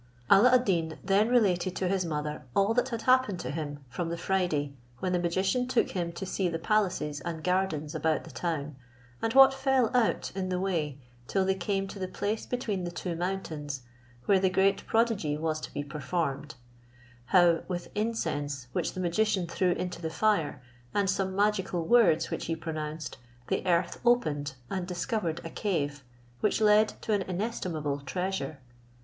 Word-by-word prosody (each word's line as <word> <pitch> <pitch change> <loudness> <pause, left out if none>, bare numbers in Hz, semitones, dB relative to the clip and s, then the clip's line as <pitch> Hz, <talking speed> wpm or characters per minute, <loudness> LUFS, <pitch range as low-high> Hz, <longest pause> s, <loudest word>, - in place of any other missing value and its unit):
Alla 215 +6 +8
ad 250 0 +3
Deen 165 -5 0
then 200 +4 +3
related 190 -7 +2
to 185 - -1
his 190 0 +1
mother 150 -2 -3
all 200 +3 +3
that 245 +2 +1
had 230 -2 -4
happened 255 -7 +3
to - - -4
him 145 -2 -5
from 165 +8 -3
the 170 - -3
Friday, 170 -6 0 0.2
when 185 +6 -2
the 180 - +2
magician 190 +8 +1
took 250 -2 +1
him 175 -2 -2
to 170 +3 -5
see 185 -1 0
the 165 - -2
palaces 180 -6 0
and 160 +1 -5
gardens 180 -5 0
about 160 0 0
the - - -11
town, 150 -4 -3 0.5
and 225 - 0
what 270 0 +9
fell 265 -3 +1
out 240 -3 +2
in 190 -1 -3
the 180 -1 0
way, 165 -7 -1 0.3
till 195 -1 +1
they 190 - +3
came 195 +1 -1
to 195 - -8
the 185 - -2
place 210 +4 -3
between 220 -7 -2
the 175 - -2
two 175 0 -4
mountains 160 -6 -4 0.4
where 195 -2 +4
the 190 0 +3
great 195 +1 +2
prodigy 220 -10 +1
was 155 0 -1
to - - -7
be 145 - -3
performed; 145 0 -3 0.7
how, 175 +1 +5
with 175 -2 -4
incense 145 - -2
which - - -1
the - - -6
magician 185 +2 +1
threw 180 +2 0
into 180 -1 -4
the 160 - -2
fire, 165 -7 +1 0.3
and 200 -1 +3
some 190 -1 -1
magical 195 -4 +1
words 195 -7 +4
which - - -3
he 165 - 0
pronounced, 155 -2 -5 0.3
the - - 0
earth 170 0 +1
opened, 150 - +2
and 180 +4 -3
discovered 175 -2 -2
a - - -4
cave, 145 -9 -2 0.4
which 210 - +1
led 215 0 +5 0.2
to 220 - 0
an 205 - +2
inestimable 180 -7 -2
treasure. 180 -1 -3
180 Hz, 180 wpm, -29 LUFS, 160-205 Hz, 0.7 s, what